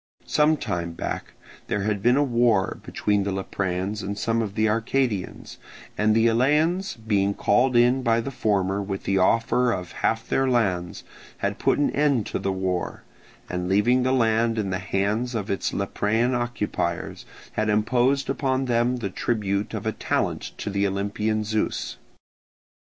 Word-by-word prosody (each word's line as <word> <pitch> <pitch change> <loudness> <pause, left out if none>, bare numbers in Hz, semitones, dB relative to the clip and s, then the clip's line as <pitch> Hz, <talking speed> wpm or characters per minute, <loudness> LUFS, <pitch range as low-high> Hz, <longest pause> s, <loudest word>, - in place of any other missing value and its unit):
Some 150 +1 +3
time 85 - -3
back - - -5 0.3
there 105 - -1
had 105 -1 -1
been 120 +5 +4
a 145 - +4
war 120 -7 +2
between 105 -1 0
the 100 0 -1
Lepreans 95 +1 -2
and 100 +1 -4
some 115 +1 0
of 105 -2 -4
the 110 0 +2
Arcadians; 115 -2 -1 0.4
and 110 +1 +2
the 115 0 +4
Eleans 150 +11 +2
being 100 -3 0
called 125 +4 +2
in 120 +2 +4
by 115 -2 +2
the 115 +4 -4
former 100 -5 0
with 95 -1 -4
the 95 0 +1
offer 115 +5 +3
of 90 -5 -4
half 115 0 -1
their 135 0 +1
lands, 95 -8 0 0.3
had - - -2
put - - +2
an 145 - +2
end 140 -7 +2
to - - -3
the 95 - -1
war, 95 -2 -2 0.4
and 90 0 -3
leaving 105 +6 +3
the 130 +1 +1
land 115 -2 +2
in 100 -3 -1
the 95 - -1
hands 105 +6 -1
of 105 -3 -2
its 100 - -1
Leprean 110 +5 0
occupiers 120 -8 -3 0.2
had 110 0 -1
imposed 125 +6 +2
upon 135 -1 0
them 120 0 +1
the 115 -5 -3
tribute 100 -2 -1
of - - -5
a - - +1
talent - - -2
to 100 - -4
the 100 0 +1
Olympian 105 +2 -1
Zeus. 110 0 -2
110 Hz, 165 wpm, -24 LUFS, 100-120 Hz, 0.4 s, been